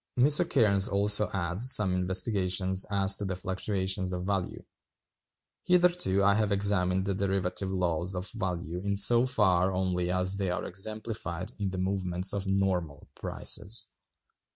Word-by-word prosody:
Cairnes 125 - +3
also 105 0 +3
adds 95 +7 +3
some 100 -4 +4
investigations 95 0 +1
as 100 -1 +1
to 105 - -3
the 95 -1 -3
fluctuations 95 0 -3
of 90 -1 -4
value: 95 -2 -3 1.0
"Hitherto 175 - +2
I 100 +1 +4
have 105 0 0
examined 95 -2 +1
the 100 - -1
derivative 95 -1 -2
laws 90 -1 -2
of 90 +2 -4
value 90 -1 -5
in 100 0 -1
so 120 +5 +5
far 95 -6 +2
only 90 -1 -2
as 90 +2 -1
they 95 -2 -2
are 90 - -3
exemplified 95 -2 -6
in 100 -2 -2
the 95 - -6
movements 95 -1 -1
of 100 -1 -3
normal 95 -6 -2
prices. 105 +3 -1
95 Hz, 140 wpm, -28 LUFS, 90-100 Hz, 1.0 s, so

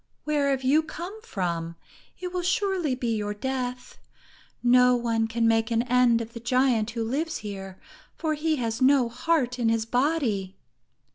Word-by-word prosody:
"Where 295 -2 +1
have 265 -1 0
you 285 +5 +4
come 350 +7 -8
from? 170 - -3 0.4
It 360 0 -5
will 360 - -1
surely 370 -5 0
be 240 -3 -1
your 210 -1 -3
death! 250 +1 -4 0.6
No 250 0 +5
one 230 -2 0
can 230 0 +1
make 225 0 +2
an 230 0 +1
end 250 -2 +3
of 230 0 -8
the 235 - -7
giant 240 -2 +2
who 230 -1 -3
lives 300 +8 -2
here, 195 -2 -7 0.4
for 315 -2 -1
he 310 +1 0
has 230 -3 -3
no 260 -2 +4
heart 250 0 0
in 230 -2 +2
his 225 -1 +1
body." 240 - 0
250 Hz, 165 wpm, -26 LUFS, 225-290 Hz, 0.6 s, No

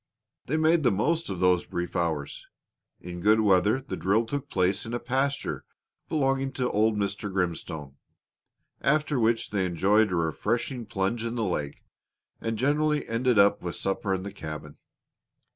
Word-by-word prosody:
They 155 - 0
made 160 +1 +4
the 130 - +4
most 150 - 0
of 95 -3 -4
those 90 -1 +3
brief 90 0 -4
hours. 80 -5 -2 0.5
In 90 0 -7
good 110 +3 +4
weather 105 +4 +3
the 95 - -5
drill 105 +5 +1
took 140 +3 -4
place 95 +2 +1
in 115 +2 -4
a - - -2
pasture 135 +3 -1 0.5
belonging 135 -2 0
to 125 -2 -1
old 110 +1 +2
Mr. 100 0 -2
Grimstone, 80 -6 -3 0.8
after 150 -1 +2
which 115 0 +1
they 100 -2 +1
enjoyed 95 +4 +3
a - - 0
refreshing 110 - -1
plunge 110 +1 -1
in 115 0 -3
the 115 - -1
lake, 75 -7 -3 0.5
and 115 -1 -2
generally 150 +3 +1
ended 120 +1 +1
up 100 0 +5
with 85 -1 -4
supper 95 0 -2
in 95 -1 -1
the 100 0 -6
cabin. 75 -5 -7
105 Hz, 160 wpm, -27 LUFS, 90-130 Hz, 0.8 s, up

